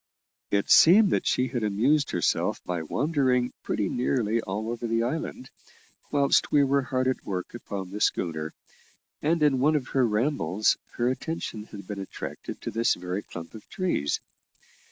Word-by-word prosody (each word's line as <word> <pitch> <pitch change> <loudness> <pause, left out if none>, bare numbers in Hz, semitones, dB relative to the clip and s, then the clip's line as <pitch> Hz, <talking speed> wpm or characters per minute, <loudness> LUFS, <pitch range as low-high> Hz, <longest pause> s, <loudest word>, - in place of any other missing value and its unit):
It 100 0 0
seemed 195 +4 +7
that - - +1
she 130 0 +1
had 120 -1 -2
amused 125 +8 +2
herself 90 - 0
by 90 -2 -2
wandering 130 - +1
pretty 105 - -1
nearly 115 -2 0
all 110 +3 -3
over 120 0 -4
the 115 0 +1
island, 130 -1 -4 0.6
whilst 140 -1 +2
we 145 -1 +5
were 140 0 +2
hard 130 0 -1
at 130 - -1
work 90 -2 -4
upon 100 -5 -6
the 105 +1 -6
schooner, 80 -3 0 0.7
and 160 +1 +1
in 140 -3 +4
one 150 +4 +3
of 135 -4 -1
her 130 -3 +2
rambles 105 - +1 0.2
her 120 - 0
attention 130 -5 -3
had 100 -3 -10
been 100 0 -6
attracted 95 - -7
to - - -4
this 115 +2 +2
very 90 +2 -4
clump 85 -4 -9
of 110 -2 -12
trees. 175 - -1
120 Hz, 165 wpm, -27 LUFS, 100-140 Hz, 0.7 s, seemed